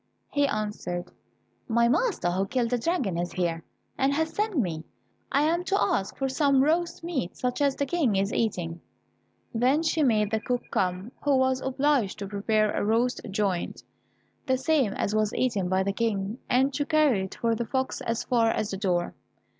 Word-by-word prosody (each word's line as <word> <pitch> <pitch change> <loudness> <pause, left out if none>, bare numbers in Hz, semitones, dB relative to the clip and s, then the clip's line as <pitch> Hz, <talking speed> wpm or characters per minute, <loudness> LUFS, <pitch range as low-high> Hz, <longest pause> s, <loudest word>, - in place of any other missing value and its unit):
He 285 -1 +2
answered, 210 -6 -3 0.6
"My 235 0 +3
master, 315 - +1
who 190 +2 0
killed 240 +1 0
the 245 - +1
dragon, 240 - 0
is 175 0 -3
here, 170 -3 -1 0.4
and 270 +1 +3
has 320 +1 -1
sent 420 -2 -1
me. 170 - -1 0.5
I 280 - +3
am 335 +3 +1
to 390 +1 +1
ask 200 - 0
for 270 - 0
some 270 0 +3
roast 335 +3 0
meat 280 - -3
such 250 +2 -2
as 280 -2 +3
the 280 - -1
King 275 - +1
is 195 +2 0
eating." 175 -7 -1 0.7
Then 255 +7 +2
she 320 0 +1
made 215 -6 +2
the 220 - +1
cook 245 +2 -2
come, 185 +4 -1
who 285 -2 +3
was 260 0 +2
obliged 265 -5 +1
to 200 - -5
prepare 210 +1 +1
a - - -1
roast 230 +4 +1
joint, 195 -3 -2 0.6
the 260 -1 +2
same 265 -6 +2
as 205 - -1
was 215 0 +1
eaten 210 -8 0
by 190 +1 +2
the 200 +1 -1
King, 210 0 -1
and 265 +2 +3
to 290 +2 0
carry 300 -11 +3
it 190 - -9
for 230 -1 0
the 230 +1 -2
fox 260 +3 -2
as 230 0 -2
far 235 -3 +2
as 215 -2 -1
the 195 - -3
door. 180 -3 0
235 Hz, 190 wpm, -27 LUFS, 195-280 Hz, 0.7 s, My